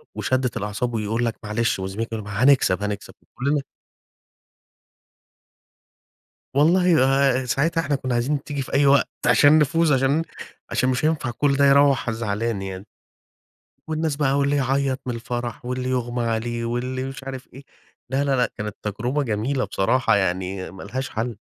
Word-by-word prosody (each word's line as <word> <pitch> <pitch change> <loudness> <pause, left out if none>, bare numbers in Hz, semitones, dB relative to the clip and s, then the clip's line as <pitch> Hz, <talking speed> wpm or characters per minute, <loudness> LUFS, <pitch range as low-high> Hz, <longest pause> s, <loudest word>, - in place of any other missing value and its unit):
وشدَّة 130 -2 0
الأعصاب 105 +4 -3
ويقول 110 +2 -1
لَك 115 - -1
معلش، 105 0 0
وزميلك 95 +4 -3
يقول 110 -2 -4
لَك: - - -8
"ما 105 +5 -1
هنكسب، 125 -8 +4
هنكسب" 105 -1 -4
وكلنا 140 +3 -2 2.9
والله 165 -1 +4
آآ، 135 -1 +2
ساعتها 160 +6 +1
إحنا 145 -2 0
كنا 130 -2 -3
عايزين 135 +4 0
تيجي 145 -2 -3
في - - -7
أي 140 +1 +4
وقت 140 0 +4 0.2
عشان 150 +2 +6
نفوز، 160 +1 +3
عشان 135 +3 +2
م - - -1 0.5
عشان 130 - +1
مش 125 +2 0
هينفع 155 -6 0
كل 140 +3 +1
ده 140 - +4
يروَّح 140 -3 +4
زعلان 110 -1 -2
يعني. 95 +1 -7 1.0
والناس 155 -2 -1
بقى 140 -1 +1
واللي 140 +1 +2
يعيط 135 0 0
من 125 - -2
الفرح 120 0 -5
واللي 125 +1 -3
يُغمى 120 -1 -1
عليه 115 +1 -2
واللي 125 +2 -2
مش 135 0 -7
عارف 130 -1 -7
إيه، 135 +1 -11 0.5
لا، 135 +2 +1
لا، 135 -1 +1
لا، 125 - +1
كانت 105 -1 -5
تجربة 120 +8 -2
جميلة 125 +3 -1
بصراحة 125 +4 +2
يعني 95 -1 -2
ما 95 - -11
لهاش 130 +6 -4
حل. 115 0 -3
130 Hz, 160 wpm, -23 LUFS, 115-140 Hz, 2.9 s, عشان